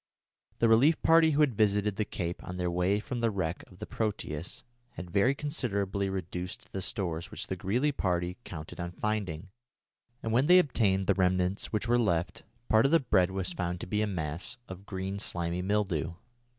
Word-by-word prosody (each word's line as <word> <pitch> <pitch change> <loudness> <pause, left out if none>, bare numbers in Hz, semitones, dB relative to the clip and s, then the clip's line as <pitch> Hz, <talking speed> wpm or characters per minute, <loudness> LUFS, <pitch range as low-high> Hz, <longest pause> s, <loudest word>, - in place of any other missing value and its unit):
The 115 - +3
relief 125 +9 +5
party 165 0 +6
who 150 0 +2
had 145 -5 +4
visited 105 -1 +2
the 105 - -1
cape 85 -3 -4
on 90 - -6
their 90 -1 -1
way 90 +4 +1
from 120 +3 -4
the 115 -1 +2
wreck 95 -5 -2
of 95 - -16
the - - -6
Proteus 90 -7 -4 0.3
had 85 +1 -8
very 115 +8 +3
considerably 100 - -1
reduced 90 -1 -5
the 95 - -4
stores 85 -4 -3
which - - -5
the - - -3
Greely 125 +10 +1
party 90 -7 -1
counted 80 -1 -8
on 85 0 -4
finding, 100 -4 -3 0.7
and 110 - -1
when 130 +5 +3
they 180 +1 +8
obtained 105 - +2
the 100 - +4
remnants 90 +1 +1
which 110 +1 -1
were 120 +1 +3
left, 85 -7 0 0.3
part 110 +4 +5
of - - -2
the 165 - +6
bread 95 - +3
was 95 -1 -2
found 90 0 -2
to - - -4
be 105 +3 -1
a 110 - +1
mass 85 +4 -4
of 95 +2 -10
green 95 +1 -4
slimy 85 -3 -1
mildew. 95 -5 0
95 Hz, 190 wpm, -30 LUFS, 90-110 Hz, 0.7 s, they